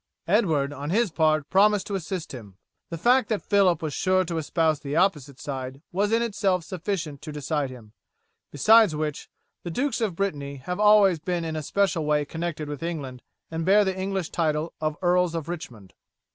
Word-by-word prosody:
Edward, 160 -8 +2
on 145 +1 -6
his 210 +2 +1
part, 155 -2 +2
promised 205 +1 +4
to 205 - -6
assist 185 -2 -4
him. 105 -7 -10 0.3
The 170 - -5
fact 245 +6 +3
that 215 -3 0
Phillip 195 -5 +3
was 155 -2 -3
sure 185 +3 +2
to 165 -1 -3
espouse 160 -1 0
the 140 +1 -5
opposite 150 -7 0
side 135 0 -6
was 205 +3 0
in 230 +1 +2
itself 195 -5 0
sufficient 170 -4 -4
to 155 - -7
decide 145 -1 -2
him; 115 -4 -13 0.6
besides 215 - +5
which, 150 -1 -4 0.3
the 175 - -6
dukes 245 - -1
of 205 -6 -1
Brittany 145 -7 -3
have 180 +8 -5
always 210 -4 +5
been 175 +1 -2
in 160 -1 -3
a 155 - -2
special 190 +1 0
way 150 -1 +1
connected 160 -1 -4
with 145 -1 -6
England 145 -7 -5 0.3
and 165 0 -3
bear 200 +4 +5
the 190 -1 -1
English 190 -2 -3
title 155 -1 -1
of 155 -1 -1
Earls 180 -1 +2
of 165 -2 -4
Richmond. 120 - -8
165 Hz, 185 wpm, -25 LUFS, 150-195 Hz, 0.6 s, besides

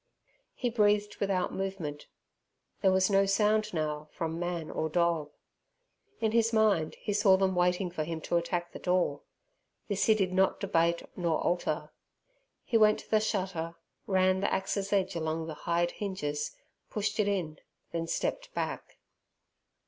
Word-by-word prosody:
He 245 -2 -1
breathed 210 -2 +2
without 195 -2 0
movement. 185 -7 -4 0.7
There 190 - +5
was 190 +1 +3
no 195 0 +4
sound 210 +2 +2
now 150 -2 -2
from 165 0 -3
man 175 -2 -3
or 160 - -1
dog. 170 -2 +1 0.9
In 220 - +1
his 230 0 +3
mind 210 -8 +2
he 205 - -3
saw 200 -2 +5
them 190 0 +2
waiting 180 +1 +1
for 160 -3 -2
him 165 +1 -4
to 175 - 0
attack 170 0 -2
the - - -8
door; 180 - +1 0.7
this 200 -1 +1
he 220 - +5
did 190 -3 0
not 190 +1 +2
debate 170 -3 +1
nor 170 -3 0
alter. 175 0 -1 0.7
He 230 - +2
went 215 -1 +5
to - - -20
the 215 - +5
shutter, 185 -6 -2 0.3
ran 185 -1 +3
the 195 - 0
axe's 195 +1 -1
edge 195 -2 +1
along 160 0 -2
the 160 - -5 0.2
hide 175 +1 +2
hinges, 150 -8 -3 0.3
pushed 210 +1 -2
it 210 - +3
in, 180 -6 -2 0.3
then 165 0 -2
stepped - - -2
back. - - -4
185 Hz, 155 wpm, -30 LUFS, 170-205 Hz, 0.9 s, There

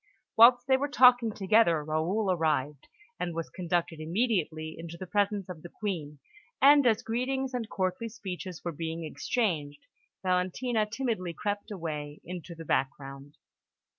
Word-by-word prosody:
Whilst 245 +2 +7
they 265 0 +4
were 285 +2 -1
talking 250 -5 +5
together, 195 -6 +3
Raoul 170 +7 0
arrived, 150 -5 -1 0.3
and 175 -2 -3
was 165 -1 -4
conducted 175 -2 -2
immediately 160 -3 -1
into 170 0 -8
the 185 - -6
presence 200 +1 0
of 180 -4 -8
the 175 - -10
Queen; 165 -9 -4 0.4
and 285 -1 +7
as 220 -3 +2
greetings 260 +3 -2
and 235 -3 -3
courtly 185 +4 -2
speeches 185 -6 -7
were 170 - -1
being 165 +1 -5
exchanged, 155 -5 -2 0.4
Valentina 190 +5 0
timidly 220 -7 -2
crept 205 +5 -3
away 155 -6 -5
into 175 0 -8
the 165 0 -9
background. 135 +1 -3
180 Hz, 140 wpm, -29 LUFS, 160-225 Hz, 0.4 s, Whilst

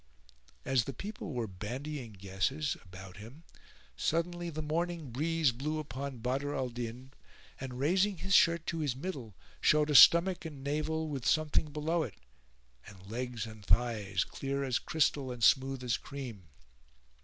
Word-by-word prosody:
As 130 -4 +2
the 135 - -4
people 200 - -6
were 120 -4 -2
bandying 120 +6 -6
guesses 100 +10 -1
about 95 0 -11
him 120 +10 -11 0.5
suddenly 175 +1 -1
the 155 -1 -4
morning 165 -2 -2
breeze 155 +2 +2
blew 145 +6 -3
upon 140 -3 -5
Badr 135 +5 -2
al 130 -1 -1
Din 120 +2 -6 0.5
and 130 -2 -6
raising 185 +8 +2
his 195 +4 -2
shirt 170 -3 +5
to 165 - -2
his 145 -5 0
middle 130 - -6 0.3
showed 150 0 +4
a - - +2
stomach 170 +5 +8
and 150 -5 -8
navel 155 +2 -1
with 140 -5 -4
something 155 +1 +2
below 155 +3 0
it, 120 -10 -4 0.7
[FN#433] - - -9
and 95 +3 -13
legs 120 -1 -3
and 110 -2 -10
thighs 105 -4 +2
clear 140 0 -3
as 130 -3 +1
crystal 150 -5 +1
and 120 -2 -5
smooth 135 +2 +4
as 120 -2 +1
cream. 120 - -8
135 Hz, 155 wpm, -32 LUFS, 120-155 Hz, 0.7 s, stomach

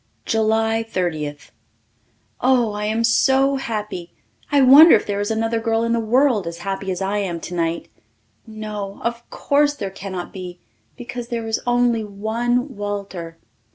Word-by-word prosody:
July 225 0 +1
Thirtieth. 160 -9 -4 0.9
Oh, 250 -3 +3
I 210 0 -4
am 220 +2 0
so 265 +4 +3
happy! 210 -8 -5 0.4
I 285 - +4
wonder 280 +5 +9
if - - 0
there 200 -1 -2
is 205 +1 -1
another 225 +1 0
girl 225 0 0
in 230 0 0
the 235 - +1
world 230 -3 +2
as 170 0 -5
happy 195 0 -3
as 185 +1 -3
I 200 +2 -1
am 180 -4 -3
tonight. 170 -1 -3 0.6
No, 210 -2 -6
of 235 0 -4
course 290 +1 +1
there 200 -7 -5
cannot 190 -2 -7
be, 180 -2 -8 0.4
because 245 -1 -7
there 235 -2 -3
is 225 - -1
only 240 -2 +2
one 235 +6 -2
Walter! 200 -5 -5
220 Hz, 155 wpm, -21 LUFS, 195-240 Hz, 0.9 s, wonder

